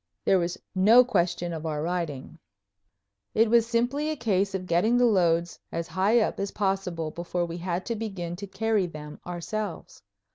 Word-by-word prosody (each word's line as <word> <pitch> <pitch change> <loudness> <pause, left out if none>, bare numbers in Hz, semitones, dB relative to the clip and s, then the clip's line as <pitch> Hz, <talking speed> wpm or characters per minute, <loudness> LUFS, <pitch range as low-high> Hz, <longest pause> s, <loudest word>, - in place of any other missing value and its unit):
There 190 - +4
was 175 +1 -2 0.2
no 215 +7 +7
question 175 -5 0
of 160 -1 -5
our 155 -2 -2
riding. 165 -3 -4 1.0
It 225 0 +4
was 235 -1 +5
simply 245 +6 0
a 310 - -1
case 200 -6 0
of 185 -1 -3
getting 190 +8 +2
the 245 - +5
loads 170 -6 +2
as 165 0 -4
high 200 +6 +3
up - - -1
as 200 0 -1
possible 190 -6 -2
before 175 +1 -2
we 170 0 -6
had 180 +1 -3
to 230 - -2
begin 195 -6 -4
to 200 +1 -7
carry 205 0 0
them 150 -2 -9
ourselves. 180 +2 -5
185 Hz, 175 wpm, -27 LUFS, 170-220 Hz, 1.0 s, no